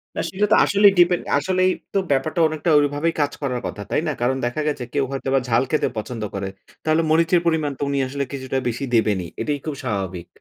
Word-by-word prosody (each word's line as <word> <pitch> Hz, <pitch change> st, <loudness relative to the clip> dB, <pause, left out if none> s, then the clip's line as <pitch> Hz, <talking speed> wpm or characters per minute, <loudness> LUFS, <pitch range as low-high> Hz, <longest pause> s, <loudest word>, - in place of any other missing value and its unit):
না -, -, -1 dB
সেটা 200 Hz, +2 st, 0 dB
তো -, -, +7 dB
আসলেই 200 Hz, 0 st, +5 dB
ডিপেন্ড, 175 Hz, 0 st, +4 dB
আসলেই 185 Hz, +5 st, +2 dB, 0.2 s
তো -, -, +1 dB
ব্যাপারটা 140 Hz, +5 st, 0 dB
অনেকটা 155 Hz, +2 st, -2 dB
ওইভাবেই 145 Hz, +3 st, 0 dB
কাজ 145 Hz, -, +1 dB
করার 125 Hz, -4 st, -2 dB
কথা, 105 Hz, -, -7 dB
তাই -, -, +2 dB
না? -, -, +1 dB
কারণ 130 Hz, +2 st, +1 dB
দেখা 120 Hz, +5 st, -2 dB
গেছে, 145 Hz, -4 st, -2 dB
কেউ 140 Hz, -, +2 dB
হয়তো 135 Hz, 0 st, -4 dB, 0.2 s
ঝাল 115 Hz, +2 st, +3 dB
খেতে 155 Hz, -, +2 dB
পছন্দ 110 Hz, 0 st, -4 dB
করে। 100 Hz, 0 st, -3 dB, 0.4 s
তাহলে 155 Hz, +1 st, +2 dB
মরিচের 165 Hz, +2 st, +3 dB
পরিমাণ 160 Hz, -3 st, +1 dB
তো -, -, -14 dB
উনি 140 Hz, -, -1 dB
আসলে 140 Hz, +1 st, -3 dB
কিছুটা 135 Hz, -1 st, -3 dB
বেশি 120 Hz, +3 st, -2 dB
দেবেনই, 105 Hz, -6 st, +2 dB
এটাই 145 Hz, -1 st, -1 dB
খুব 155 Hz, -, -3 dB
স্বাভাবিক। 95 Hz, -4 st, -3 dB
145 Hz, 210 wpm, -22 LUFS, 120-160 Hz, 0.4 s, তো